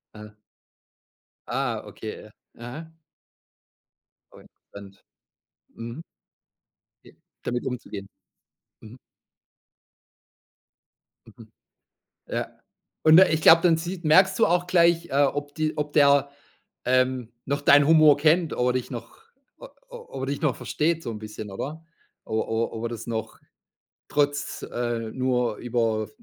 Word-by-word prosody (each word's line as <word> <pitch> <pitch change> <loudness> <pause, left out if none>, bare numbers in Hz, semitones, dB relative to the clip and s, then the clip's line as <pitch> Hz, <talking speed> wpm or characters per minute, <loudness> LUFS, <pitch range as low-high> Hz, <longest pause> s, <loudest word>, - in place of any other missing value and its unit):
Ah. 105 0 -12 1.1
Ah, - - -2
okay. - - -9 0.3
Aha. 155 +8 -9 1.4
Auch - - -16 0.3
interessant. 100 -1 -12 0.8
Mhm. 115 +7 -7 1.0
J - - -17 0.3
damit 120 0 -3
umzugehen? 105 -6 -6 0.7
Mhm. 110 +3 -13 2.3
Mhm. - - -16 0.8
Ja. - - -3 0.5
Und, 160 +1 +7
äh, 190 - +6
ich 160 - 0
glaub, 165 +1 +8
dann 165 -3 +4
sieht 175 +2 -6
merkst 190 +5 +5
du - - +5
auch 175 +1 +1
gleich, 170 -1 +3
äh, 140 +1 +3
ob 145 +1 -2
die 155 -1 -2
ob 150 0 -3
der, 140 -1 +4 0.6
ähm, 130 -2 +1
noch 140 +1 -2
deinen 145 0 +5
Humor 155 -3 +6
kennt, 160 +2 +2
ob 125 - 0
er 125 - +2
dich 130 -1 -3
noch - - -8 0.4
o - - -10 0.2
ob 475 - -9
er - - 0
dich 140 +1 -3
noch 150 -6 +1
versteht 165 +1 -1
so 115 - -4
'n 105 - -7
bisschen, 105 -1 -8
oder? 155 +10 -6 0.4
O 110 0 -2
o 115 +1 -2
ob 115 +1 -6
er - - -2
das 115 0 -7
noch 110 -1 -5 0.7
trotz, 145 -1 -1
äh, 120 -2 -3
nur 125 -4 -1
über 115 -3 -1
140 Hz, 130 wpm, -25 LUFS, 115-160 Hz, 2.3 s, glaub